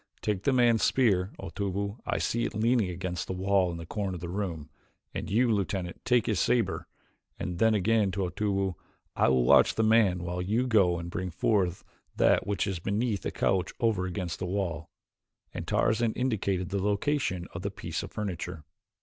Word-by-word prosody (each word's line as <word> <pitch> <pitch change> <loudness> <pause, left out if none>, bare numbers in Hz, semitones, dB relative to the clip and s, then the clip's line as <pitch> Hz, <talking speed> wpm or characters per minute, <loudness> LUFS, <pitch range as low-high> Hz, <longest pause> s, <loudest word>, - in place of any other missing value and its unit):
Take 105 -3 -1
the - - +4
man's 120 -3 +4
spear, 100 -8 +3
Otobu; 100 +3 -3
I - - 0
see 120 0 0
it - - -3
leaning 115 -2 +2
against 90 0 -4
the - - -3
wall 95 0 +2
in 85 - -5
the 85 - -7
corner 100 +1 -3
of - - -6
the 85 +1 -6
room. 85 -5 -4 0.4
And - - -4
you, 115 +4 +3
Lieutenant, 95 -3 -2
take 125 -3 +3
his 105 -5 0
saber," 115 -3 +1 0.5
and 90 -3 -4
then 110 -1 +4
again 105 0 +2
to 100 - -2
Otobu, 95 0 -1 0.4
"I - - +3
will 65 -2 +3
watch - - +5
the 110 - +2
man 110 -6 +3
while 90 +1 -3
you 110 +7 +1
go 100 -8 +3
and 85 +1 -6
bring 95 -2 -3
forth 90 0 0 0.3
that - - +3
which 100 0 0
is 95 -4 -3
beneath 105 +2 -1
the - - -2
couch 95 -2 0
over 105 -6 +1
against 90 -2 -4
this 95 - -3
wall," 85 -5 -2 0.6
and - - -6
Tarzan 110 0 +2
indicated 100 -7 -1
the 100 0 -1
location 100 -3 0
of 85 - -5
the 100 - -2
piece 95 -4 -5
of - - -8
furniture. 90 -6 -5
95 Hz, 190 wpm, -28 LUFS, 90-110 Hz, 0.6 s, watch